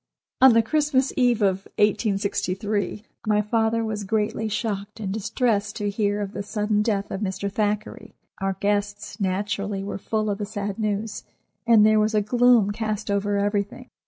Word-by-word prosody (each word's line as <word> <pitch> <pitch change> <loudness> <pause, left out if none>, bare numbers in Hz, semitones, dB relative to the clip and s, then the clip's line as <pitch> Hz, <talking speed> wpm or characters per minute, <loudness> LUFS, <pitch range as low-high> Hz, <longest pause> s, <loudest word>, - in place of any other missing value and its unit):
'" - - -50
On 260 -2 +8
the 230 0 +4
Christmas 280 +1 +1
Eve 245 -4 +2
of 195 0 +1
1863 205 -1 0 0.2
my 210 -1 +3
father 225 +1 +1
was 215 -1 -3
greatly 220 +2 -1
shocked 210 -1 -3
and 195 -3 -3
distressed 215 -1 0
to 205 -2 -2
hear 205 0 0
of 200 -1 -4
the 200 - -5
sudden 210 0 0
death 205 -2 -1
of 195 - -4
Mr. 200 0 -2
Thackeray. 210 +1 -2 0.3
Our 195 0 0
guests, 205 +1 -2
naturally, 200 +1 -2
were 200 0 -5
full 215 +1 -1
of 200 - -3
the 205 - -2
sad 205 -1 -4
news, 215 0 -2 0.4
and 225 -3 +7
there 215 0 +5
was 215 +1 +1
a 210 - +4
gloom 240 -1 +4
cast 215 -1 -3
over 200 0 0
everything. 205 0 -2
210 Hz, 170 wpm, -24 LUFS, 200-220 Hz, 0.4 s, On